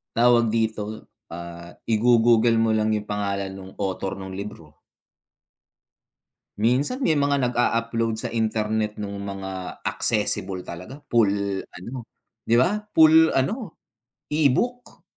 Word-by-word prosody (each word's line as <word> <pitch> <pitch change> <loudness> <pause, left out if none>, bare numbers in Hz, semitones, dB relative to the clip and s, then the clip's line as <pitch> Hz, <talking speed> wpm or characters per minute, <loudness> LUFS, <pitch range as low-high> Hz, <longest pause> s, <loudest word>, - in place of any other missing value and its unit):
tawag 120 -1 +4
dito, 110 -1 -2 0.2
ah, 85 0 -8 0.2
igo-Google 115 0 +4
mo 115 -1 +2
lang 110 0 +1
yung 105 -1 -2
pangalan 100 -1 -2
nung 95 0 -10
author 95 -1 -3
nung 95 0 -7
libro. 95 -7 -9 1.8
Minsan, 130 - +1
may 165 - +2
mga 140 -1 +2
nag-a-upload 115 -2 0
sa 125 - -3
internet 110 -2 -1
nung 100 -1 -5
mga 95 -2 -6
accessible 100 -3 0
talaga, 90 - -8
full 100 -4 +1
ano, 120 +7 -9 0.4
'di 115 - +2
ba, 210 +9 +1
full 160 0 +6
ano, 195 - -2 0.5
e-book. 160 - 0
110 Hz, 115 wpm, -24 LUFS, 100-120 Hz, 1.8 s, full